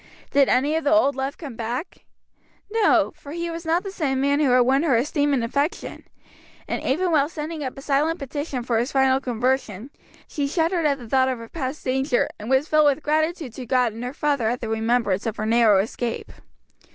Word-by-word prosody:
Did 280 -1 +4
any 280 +5 +2
of 320 - -1
the 290 - +1
old 315 -4 +4
love 270 +1 -3
come 285 -9 -8
back? 240 +8 -5 0.7
No, 400 -8 +3
for 295 -1 -10
he 340 0 -3
was 330 0 -7
not 335 +3 +2
the 325 -9 -2
man 280 +2 +1
who 295 -3 +3
had 250 0 +5
won 265 +3 +3
her 305 -6 +2
esteem 290 +4 +1
and 265 -4 +1
affection; 280 +7 -2 0.6
and - - -3
even 350 +7 0
while 295 -2 +3
sending 310 -1 -5
up 260 -1 -5
a 275 - -9
silent 300 +4 +1
petition 280 -2 -4
for 235 -2 0
his 240 +3 -2
final 265 -1 +3
conversion, 250 -2 -2 0.4
she 285 -2 -2
shuddered 330 +2 +1
at 280 -1 +1
the 245 -4 -11
thought 260 +2 +2
of 255 - -2
her 230 0 -9
past 280 -2 -5
danger, 265 0 +1
and 210 +2 -7
was 265 +3 +2
filled 305 -1 +4
with 290 +2 +1
gratitude 310 -3 -1
to 250 -1 -8
God 250 -3 +2
and 230 +2 -7
her 250 - -3
father 285 -5 0
at 245 +2 -2
the 225 - -5
remembrance 225 -3 0
of 220 - -3
her 215 - -2
narrow 225 -2 +4
escape. 225 +4 -3
275 Hz, 210 wpm, -23 LUFS, 245-305 Hz, 0.7 s, had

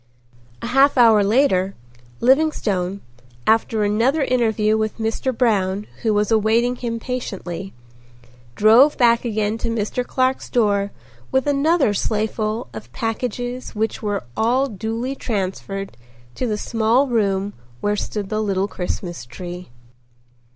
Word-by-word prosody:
A - - -2
half 270 +2 +4
hour 225 -4 +6
later, 195 -4 +2 0.5
Livingstone, 215 - +1 0.4
after 220 -1 +2
another 235 +9 +2
interview 220 -4 +2
with 220 -1 -1
Mr. 225 +3 -1
Brown 205 -5 +1 0.2
who 225 - +1
was 210 0 +1
awaiting 225 +3 +2
him 230 -2 -3
patiently, 195 -7 -5 0.8
drove 235 +8 +6
back 235 -1 +4
again 215 -1 -1
to 230 - -2
Mr. 230 +2 -1
Clark's 255 +1 -1
door 205 -4 +2 0.4
with 265 +1 +2
another 290 -3 +2
sleighful 215 - -1
of 110 +1 -9
packages 245 - -4
which 220 +1 -2
were 205 - -2
all 245 +5 +2
duly 225 +3 -3
transferred 195 - -4 0.4
to 250 - -2
the 210 -2 -1
small 230 +5 +2
room 205 -4 0 0.3
where 205 +7 0
stood 205 -1 -4
the 215 0 -1
little 195 -2 0
Christmas 180 - -5
tree. 175 +9 -8
220 Hz, 125 wpm, -21 LUFS, 200-245 Hz, 0.8 s, hour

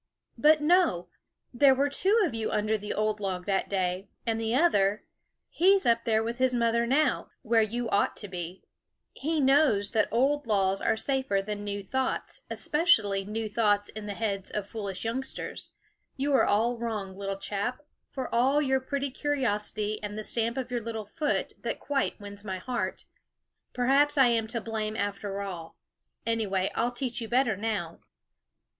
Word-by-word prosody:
"But 305 0 +5
no! 300 - +3 0.4
there 270 +2 +5
were 280 +2 +2
two 390 +10 +2
of 315 - -3
you 225 -1 -2
under 215 +1 +1
the 210 0 -5
old 215 0 0
log 185 -3 -3
that 195 -1 0
day; 185 0 -1 0.2
and 225 -1 0
the 225 +1 0
other, 210 - +3 0.4
he's 385 +3 +3
up 230 0 +3
there 220 -1 +2
with 235 +2 -4
his 255 -1 +2
mother 235 0 +2
now, 295 +5 +1
where 230 -1 +3
you 235 +2 -1
ought 200 - +1
to 205 - -5
be, 180 -1 -6 0.5
he 315 +2 -1
knows 265 -7 +3
that 220 -2 +2
old 275 +4 +1
laws 195 -2 +2
are - - +1
safer 265 -5 0
than 205 +1 -4
new 205 0 -4
thoughts, 260 +6 -2
especially 220 - +2
new 215 +2 -3
thoughts 205 -1 +1
in 215 -1 -7
the 200 - -4
heads 200 -3 -2
of 205 -2 -4
foolish 200 -3 -5
youngsters. 260 +4 -4 0.5
You 280 +1 0
are 270 - +5
all 230 +3 +1
wrong, 210 -5 -4
little 195 0 -4
chap, 205 +8 -3 0.3
for 260 -2 -4
all 260 +5 +3
your 265 -2 +2
pretty 275 +1 -3
curiosity, 215 -7 -1
and 210 0 -5
the 215 - -4
stamp 230 +3 +1
of 255 -1 -4
your 240 -1 -1
little 225 -1 -5
foot 295 +8 -2
that - - -3
quite 275 -4 -1
wins 205 0 -8
my 190 -3 -4
heart. 245 +5 -3 0.7
Perhaps 275 +4 +3
I 265 -3 +6
am 225 -2 +1
to 230 +1 -3
blame, 220 -1 -3
after 200 -1 -3
all; 175 -5 -7 0.5
anyway, 205 -5 0
I'll 240 +1 0
teach 245 0 -3
you 225 - -4
better 240 -2 +2
now." 200 -5 -3
225 Hz, 175 wpm, -28 LUFS, 205-260 Hz, 0.7 s, I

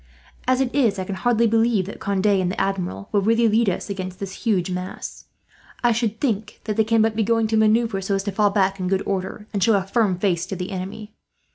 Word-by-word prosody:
"As 255 +1 +3
it 255 -2 -1
is, 235 -8 +2
I 190 - -2
can 195 - -5
hardly 235 +4 +2
believe 225 -3 +2
that 200 - -8
Conde 200 0 -1
and 190 -3 +3
the - - -4
Admiral 195 0 -2
will 205 - +2
really 230 +3 +3
lead 220 0 +3
us 180 - -3
against 185 -2 -5
that 195 -1 -5
huge 190 -4 -1
mass. 180 +1 -6 0.6
I 240 - +4
should 225 -1 -1
think 220 -5 -2
that 215 - -2
they 220 - +3
can 225 0 +3
but 220 -1 +1
be 220 - +1
going 225 +1 +2
to 220 - +1
manoeuvre 220 -1 +2
so 195 +1 -1
as 195 - -1
to 205 - -2
fall 205 +1 +3
back 195 -1 +1
in 185 - -2
good 190 0 0
order, 195 +2 -3
and 200 -2 0
show 225 +1 +4
a 195 - +1
firm 200 -2 +1
face 180 -2 0
to 195 - -4
the 180 +2 -5
enemy. 195 +3 -6
205 Hz, 245 wpm, -22 LUFS, 190-225 Hz, 0.6 s, I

